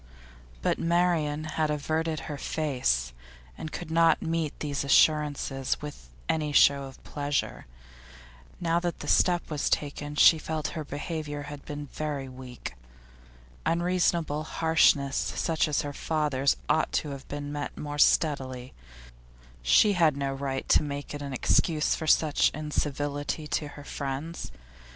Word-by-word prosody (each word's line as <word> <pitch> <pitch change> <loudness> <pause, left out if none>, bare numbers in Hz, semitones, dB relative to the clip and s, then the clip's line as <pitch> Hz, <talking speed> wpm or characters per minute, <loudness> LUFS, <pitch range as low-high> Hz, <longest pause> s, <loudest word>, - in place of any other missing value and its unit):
But - - +1
Marian 165 -3 +1
had 155 0 -1
averted 155 +1 -1
her 145 -2 -6
face, 125 - 0 0.4
and 155 - -7
could 170 -2 -6
not 165 -1 +4
meet 160 -2 -2
these 145 -2 -2
assurances 145 -2 +2
with 145 - -9 0.2
any 155 -2 0
show 140 -1 +5
of 135 -1 -12
pleasure. 145 - -3 0.9
Now 170 0 +1
that 175 -1 -3
the - - -6
step 175 -2 +2
was 150 -2 0
taken 145 0 -2
she 160 +2 +7
felt 155 0 -4
that - - -1
her 155 - -4
behaviour 150 0 -5
had 145 -1 -8
been 145 0 -6
very 145 -1 -4
weak. 130 - -8 0.9
Unreasonable 170 -2 +1
harshness 155 -4 +3
such 160 -2 0
as 150 - 0
her 145 -1 -5
father's 145 -3 0
ought 160 - +2
to 150 - -1
have 135 -1 -8
been 145 0 -5
met 145 0 -5
more 145 0 -5
steadily; 130 -5 +2 0.9
she 200 - +5
had 160 -6 +3
no 140 -1 -1
right 135 -1 -3
to - - +6
make 145 -1 -5
it 145 - -5
an 140 -1 -5
excuse 150 +4 +2
for 160 - -4
such 155 -1 +4
incivility 145 0 -2
to 150 0 -2
her 145 0 -11
friends. 145 +4 -5
150 Hz, 145 wpm, -28 LUFS, 140-160 Hz, 0.9 s, she